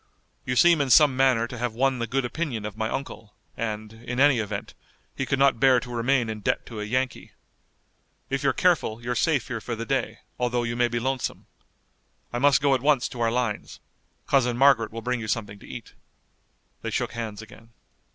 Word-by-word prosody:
You 125 Hz, -, 0 dB
seem 170 Hz, +3 st, +5 dB
in 140 Hz, -, 0 dB
some 145 Hz, +1 st, +6 dB
manner 130 Hz, -3 st, +3 dB
to 120 Hz, 0 st, -8 dB
have 120 Hz, -2 st, -2 dB
won 130 Hz, +1 st, +1 dB
the 115 Hz, -, -2 dB
good 130 Hz, +2 st, -1 dB
opinion 120 Hz, -6 st, -3 dB
of 105 Hz, -1 st, -6 dB
my 110 Hz, 0 st, -2 dB
uncle, 115 Hz, -5 st, -6 dB, 0.2 s
and, 110 Hz, -1 st, -4 dB
in 120 Hz, +2 st, -6 dB
any 140 Hz, -3 st, +5 dB
event, 105 Hz, -2 st, -4 dB, 0.4 s
he 135 Hz, -, -3 dB
could 135 Hz, -, +1 dB
not 135 Hz, -3 st, +3 dB
bear 130 Hz, -2 st, +5 dB
to 125 Hz, -, -8 dB
remain 120 Hz, +1 st, +1 dB
in 110 Hz, -1 st, -4 dB
debt 105 Hz, -, -1 dB
to 110 Hz, -3 st, -7 dB
a -, -, -3 dB
Yankee. 130 Hz, +4 st, -2 dB, 0.9 s
If -, -, -2 dB
you're -, -, +3 dB
careful 110 Hz, +1 st, +1 dB
you're 120 Hz, +1 st, -1 dB
safe 145 Hz, 0 st, +1 dB
here 115 Hz, -3 st, -4 dB
for 120 Hz, -, -4 dB
the 115 Hz, +1 st, -5 dB
day, 120 Hz, -4 st, -2 dB, 0.2 s
although 120 Hz, -1 st, 0 dB
you 115 Hz, 0 st, -2 dB
may 120 Hz, 0 st, +2 dB
be 120 Hz, 0 st, -2 dB
lonesome. 130 Hz, +1 st, -3 dB, 0.9 s
I 120 Hz, -, -1 dB
must 140 Hz, +1 st, +4 dB
go 140 Hz, -1 st, +3 dB
at 130 Hz, -, +1 dB
once 140 Hz, -2 st, +3 dB
to 120 Hz, -, -7 dB
our 115 Hz, -1 st, +2 dB
lines. 120 Hz, -3 st, -2 dB, 0.5 s
Cousin 125 Hz, -3 st, +2 dB
Margaret 135 Hz, -4 st, +4 dB
will 115 Hz, 0 st, -7 dB
bring 125 Hz, +1 st, -1 dB
you 110 Hz, -, -5 dB
something 105 Hz, -2 st, -3 dB
to -, -, -14 dB
eat." -, -, -9 dB, 0.9 s
They -, -, -3 dB
shook -, -, -2 dB
hands 115 Hz, -2 st, -5 dB
again. 115 Hz, +1 st, -15 dB
120 Hz, 210 wpm, -25 LUFS, 115-135 Hz, 0.9 s, some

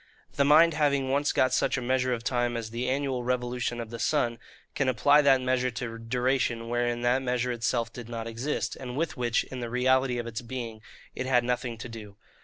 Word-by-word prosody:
The 140 Hz, -, +2 dB
mind 160 Hz, +4 st, +6 dB
having 140 Hz, -3 st, +1 dB
once 145 Hz, +1 st, +2 dB
got 130 Hz, -1 st, +2 dB
such 130 Hz, +1 st, +1 dB
a -, -, 0 dB
measure 130 Hz, +1 st, +1 dB
of 115 Hz, -2 st, -2 dB
time 120 Hz, -1 st, 0 dB
as 110 Hz, -1 st, -5 dB
the 120 Hz, +2 st, -2 dB
annual 135 Hz, -2 st, -1 dB
revolution 125 Hz, -1 st, -1 dB
of 115 Hz, -1 st, -6 dB
the 115 Hz, -, -6 dB
sun, 120 Hz, -6 st, 0 dB, 0.3 s
can 140 Hz, -2 st, +1 dB
apply 140 Hz, +5 st, +5 dB
that 135 Hz, -2 st, +4 dB
measure 130 Hz, 0 st, +1 dB
to 115 Hz, -1 st, -5 dB
duration 120 Hz, 0 st, 0 dB
wherein 120 Hz, 0 st, 0 dB
that 125 Hz, +2 st, +2 dB
measure 125 Hz, -1 st, -1 dB
itself 115 Hz, -1 st, -1 dB
did 120 Hz, -2 st, -9 dB
not 115 Hz, -1 st, -4 dB
exist, 115 Hz, +6 st, -3 dB
and 125 Hz, -1 st, -7 dB
with 165 Hz, +2 st, -1 dB
which, 120 Hz, -2 st, +1 dB
in 130 Hz, -, -8 dB
the 120 Hz, -1 st, -4 dB
reality 130 Hz, +1 st, +2 dB
of 120 Hz, -, -3 dB
its 115 Hz, 0 st, -5 dB
being, 115 Hz, -3 st, -6 dB, 0.3 s
it 130 Hz, -, -4 dB
had 125 Hz, -2 st, +3 dB
nothing 125 Hz, -1 st, -2 dB
to 115 Hz, -, -7 dB
do. 105 Hz, -3 st, -10 dB
125 Hz, 210 wpm, -28 LUFS, 115-130 Hz, 0.3 s, mind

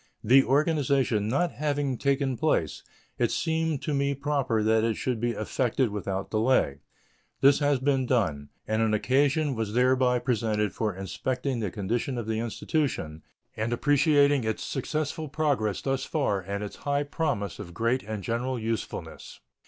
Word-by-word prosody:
The 130 Hz, +5 st, +6 dB
organization 135 Hz, -6 st, +1 dB
not 145 Hz, +9 st, +1 dB
having 145 Hz, -2 st, -1 dB
taken 135 Hz, 0 st, 0 dB
place, 120 Hz, -, 0 dB, 0.4 s
it -, -, +2 dB
seemed 160 Hz, -2 st, -1 dB
to 150 Hz, -, -1 dB
me 140 Hz, 0 st, +1 dB
proper 140 Hz, -6 st, 0 dB
that 110 Hz, 0 st, +3 dB
it 115 Hz, -1 st, +1 dB
should 125 Hz, 0 st, -2 dB
be 120 Hz, +1 st, 0 dB
effected 120 Hz, +2 st, 0 dB
without 100 Hz, -2 st, -4 dB
delay. 110 Hz, -, +2 dB, 0.6 s
This 140 Hz, +1 st, +6 dB
has 145 Hz, -1 st, +2 dB
been 135 Hz, -1 st, +1 dB
done; 85 Hz, -, 0 dB, 0.2 s
and 110 Hz, +1 st, +1 dB
an 110 Hz, -1 st, +2 dB
occasion 140 Hz, +5 st, +2 dB
was 110 Hz, -3 st, -3 dB
thereby 125 Hz, 0 st, +3 dB
presented 110 Hz, -5 st, 0 dB
for 105 Hz, -4 st, -2 dB
inspecting 125 Hz, +7 st, -3 dB
the 105 Hz, -3 st, -1 dB
condition 115 Hz, +7 st, -2 dB
of 120 Hz, -, -3 dB
the 110 Hz, 0 st, -1 dB
Institution 115 Hz, -, -2 dB, 0.3 s
and 110 Hz, +2 st, -2 dB
appreciating 145 Hz, +1 st, +3 dB
its 110 Hz, -1 st, -2 dB
successful 155 Hz, +2 st, -3 dB
progress 135 Hz, -10 st, 0 dB
thus 135 Hz, -1 st, -1 dB
far 135 Hz, -11 st, 0 dB
and 100 Hz, +3 st, -4 dB
its 105 Hz, -, -7 dB
high 145 Hz, 0 st, 0 dB
promise 145 Hz, -, -2 dB
of 85 Hz, -1 st, -8 dB
great 115 Hz, +5 st, +1 dB
and 105 Hz, -1 st, -6 dB
general 125 Hz, +4 st, -2 dB
usefulness. 115 Hz, 0 st, -5 dB
125 Hz, 155 wpm, -27 LUFS, 110-140 Hz, 0.6 s, The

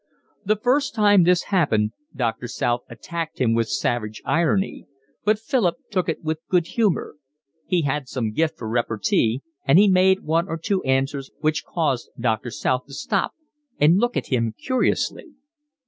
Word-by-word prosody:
The 215 Hz, +1 st, +2 dB
first 255 Hz, +5 st, +1 dB
time 205 Hz, -3 st, +5 dB
this 180 Hz, 0 st, +3 dB
happened 110 Hz, -, +2 dB, 0.2 s
Doctor 120 Hz, -2 st, -2 dB
South 120 Hz, 0 st, -1 dB
attacked 165 Hz, +8 st, -6 dB
him 120 Hz, -3 st, +2 dB
with 115 Hz, 0 st, +1 dB
savage 110 Hz, +1 st, -1 dB
irony; 170 Hz, +4 st, 0 dB, 0.4 s
but 215 Hz, +1 st, +3 dB
Philip 225 Hz, -5 st, 0 dB, 0.2 s
took 185 Hz, -4 st, 0 dB
it 165 Hz, -, -3 dB
with 155 Hz, 0 st, -2 dB
good 180 Hz, -3 st, +3 dB
humour; 205 Hz, -7 st, 0 dB, 0.5 s
he 175 Hz, -3 st, +1 dB
had 145 Hz, -1 st, -1 dB
some 115 Hz, -5 st, -2 dB
gift 155 Hz, +7 st, 0 dB
for 110 Hz, -, -6 dB
repartee, 115 Hz, +1 st, 0 dB, 0.2 s
and 140 Hz, +4 st, +5 dB
he 205 Hz, +2 st, +7 dB
made 190 Hz, 0 st, +4 dB
one 165 Hz, +3 st, +1 dB
or 165 Hz, -, -3 dB
two 185 Hz, +4 st, -1 dB
answers 135 Hz, +1 st, 0 dB
which 155 Hz, 0 st, 0 dB
caused 145 Hz, -8 st, -1 dB
Doctor 115 Hz, 0 st, 0 dB
South 125 Hz, +2 st, -1 dB
to 140 Hz, -, -10 dB
stop 195 Hz, +7 st, -1 dB, 0.4 s
and 165 Hz, +6 st, +5 dB
look 240 Hz, +1 st, 0 dB
at -, -, -3 dB
him 115 Hz, -3 st, 0 dB
curiously. 270 Hz, +4 st, -1 dB
155 Hz, 165 wpm, -23 LUFS, 120-190 Hz, 0.5 s, he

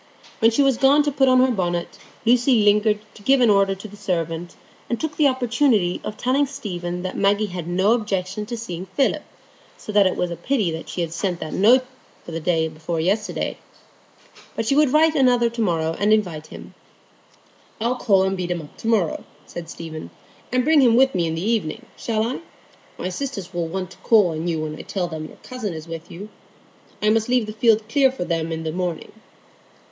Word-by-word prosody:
When 225 Hz, -, +5 dB
she 235 Hz, +5 st, +2 dB
was 270 Hz, -3 st, +3 dB
gone 280 Hz, +3 st, +5 dB
to 290 Hz, -, 0 dB
put 270 Hz, -1 st, +2 dB
on 255 Hz, 0 st, +5 dB
her 260 Hz, 0 st, +3 dB
bonnet, 175 Hz, -5 st, -2 dB, 0.3 s
Lucy 240 Hz, -1 st, +4 dB
lingered 210 Hz, +1 st, +4 dB, 0.2 s
to -, -, -15 dB
give 270 Hz, +6 st, +4 dB
an 240 Hz, -4 st, +5 dB
order 195 Hz, -1 st, +3 dB
to 195 Hz, +3 st, -9 dB
the 205 Hz, -, -13 dB
servant, 170 Hz, -3 st, -3 dB, 0.3 s
and 235 Hz, -, -1 dB
took 315 Hz, -2 st, -3 dB
the 300 Hz, -, +4 dB
opportunity 245 Hz, -7 st, +1 dB
of 215 Hz, -, -6 dB
telling 265 Hz, +5 st, +1 dB
Stephen 180 Hz, -10 st, -5 dB
that 185 Hz, -, -4 dB
Maggie 200 Hz, +2 st, +2 dB
had 175 Hz, -3 st, -5 dB
no 185 Hz, +4 st, +2 dB
objection 205 Hz, -2 st, -2 dB
to 235 Hz, -, -4 dB
seeing 185 Hz, -5 st, -6 dB
Philip, 270 Hz, +8 st, 0 dB, 0.6 s
so -, -, -8 dB
that 205 Hz, -2 st, +5 dB
it 185 Hz, -, -1 dB
was 180 Hz, -1 st, -1 dB
a -, -, -3 dB
pity 180 Hz, -10 st, -1 dB
she 160 Hz, +3 st, -4 dB
had 165 Hz, -1 st, -3 dB
sent 180 Hz, 0 st, -2 dB
that 155 Hz, -, -6 dB
note 245 Hz, +6 st, +5 dB, 0.4 s
the 165 Hz, -1 st, -5 dB
day 165 Hz, -1 st, +1 dB
before 160 Hz, +1 st, -4 dB
yesterday. 200 Hz, +6 st, -1 dB, 1.0 s
But 225 Hz, -, -2 dB
she 275 Hz, -, +2 dB
would 295 Hz, -3 st, +4 dB
write 315 Hz, +2 st, +4 dB
another 245 Hz, -5 st, +3 dB
to 235 Hz, 0 st, -4 dB
morrow 165 Hz, -5 st, 0 dB
and 205 Hz, +1 st, +2 dB
invite 175 Hz, -8 st, 0 dB
him. -, -, -11 dB, 1.1 s
"I'll 235 Hz, +3 st, +1 dB
call 195 Hz, -6 st, +3 dB
and 190 Hz, 0 st, 0 dB
beat 180 Hz, -2 st, -4 dB
him 175 Hz, -2 st, -2 dB
up 145 Hz, -, -15 dB
to -, -, -7 dB
morrow," 210 Hz, -8 st, +1 dB, 0.2 s
said 170 Hz, -1 st, -8 dB
Stephen, 160 Hz, -2 st, -8 dB, 0.4 s
"and 250 Hz, 0 st, +2 dB
bring 310 Hz, +1 st, +5 dB
him 240 Hz, -3 st, +5 dB
with 265 Hz, +2 st, +4 dB
me 170 Hz, -2 st, 0 dB
in 160 Hz, -, -2 dB
the 170 Hz, +5 st, -3 dB
evening, 215 Hz, -9 st, -1 dB
shall 220 Hz, -2 st, -1 dB
I? 245 Hz, +3 st, -3 dB, 0.6 s
My 185 Hz, -, -3 dB
sisters 200 Hz, -3 st, -5 dB
will 170 Hz, -1 st, -2 dB
want 185 Hz, +2 st, -4 dB
to -, -, -14 dB
call 210 Hz, -6 st, +4 dB
on 160 Hz, +1 st, -3 dB
you 165 Hz, -2 st, -1 dB
when 155 Hz, 0 st, -4 dB
I -, -, -5 dB
tell 185 Hz, -3 st, -3 dB
them 160 Hz, -2 st, -6 dB
your -, -, -15 dB
cousin 225 Hz, -9 st, -5 dB
is 160 Hz, +1 st, -8 dB
with 165 Hz, 0 st, -8 dB
you. 200 Hz, +5 st, -9 dB, 0.7 s
I 210 Hz, -, +4 dB
must 225 Hz, +1 st, +1 dB
leave 250 Hz, -2 st, +2 dB
the 215 Hz, -, -7 dB
field 220 Hz, -1 st, +2 dB
clear 270 Hz, +2 st, +3 dB
for 255 Hz, -9 st, -4 dB
them 165 Hz, -1 st, -2 dB
in 160 Hz, 0 st, -3 dB
the 160 Hz, -, -2 dB
morning." 175 Hz, -1 st, -3 dB
205 Hz, 215 wpm, -22 LUFS, 175-240 Hz, 1.1 s, When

